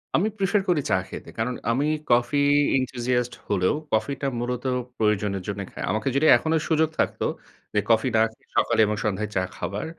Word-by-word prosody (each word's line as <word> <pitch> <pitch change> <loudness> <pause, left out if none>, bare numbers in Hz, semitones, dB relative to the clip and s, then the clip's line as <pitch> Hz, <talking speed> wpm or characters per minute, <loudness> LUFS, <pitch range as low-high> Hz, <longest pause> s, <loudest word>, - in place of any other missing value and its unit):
আমি 195 - +3
প্রেফার 195 +1 +2
করি 160 -5 +3
চা - - +5
খেতে। - - -8
কারণ 115 +3 -1 0.2
আমি 135 +5 +1 0.3
কফি 120 +4 +3 0.4
enthusiast 125 -1 -1
হলেও 95 +1 +2 0.2
কফি 110 +6 +1
টা 140 - 0
মূলত 125 0 -3 0.3
প্রয়োজনের 105 -3 0
জন্যে 100 0 -3
খাই। - - -7
আমাকে 110 +4 -2
যদি 140 +3 +3
এখনো 160 0 0
সুযোগ 160 -1 +3
থাকত, - - 0 0.5
যে 105 - +3
কফি 115 +2 +4
না 110 - +5
খেয়ে - - -31
সকালে - - +3
এবং 105 +1 -1
সন্ধ্যায় 105 0 -1
চা 95 - +2
খাবার 100 +2 -4
120 Hz, 180 wpm, -25 LUFS, 105-140 Hz, 0.5 s, চা